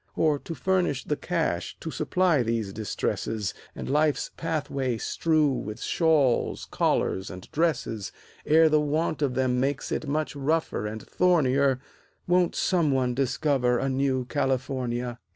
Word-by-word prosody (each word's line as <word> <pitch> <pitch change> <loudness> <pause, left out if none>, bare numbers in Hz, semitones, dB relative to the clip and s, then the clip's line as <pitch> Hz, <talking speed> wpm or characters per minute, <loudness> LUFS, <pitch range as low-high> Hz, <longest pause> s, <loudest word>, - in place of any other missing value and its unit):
Or, 150 -3 +2
to 165 - -7
furnish 180 -8 0
the 150 - -1
cash 160 - -2
to 160 - -5
supply 165 0 +2
these 115 -4 -1
distresses, 105 -1 -2 0.2
And - - -6
life's 150 +1 +1
pathway 140 -6 -2
strew 155 +4 +1
with 110 -4 -4
shawls, 155 -7 +2
collars 95 +1 0
and 90 -1 -9
dresses, 135 - -1 0.3
Ere 160 +1 +5
the 155 -1 +3
want 155 +1 -1
of 135 -3 0
them 125 -1 +1
makes 135 +1 -1
it 155 - -2
much 150 +1 -1
rougher 140 -6 -1
and 110 +1 -6
thornier, 140 -7 +2 0.5
Won't 180 0 +2
some 170 -5 +2
one 130 -2 +1
discover 130 -1 +1
a 135 +3 -1
new 130 -1 0
California? 125 -3 -2
140 Hz, 140 wpm, -26 LUFS, 125-155 Hz, 0.5 s, Ere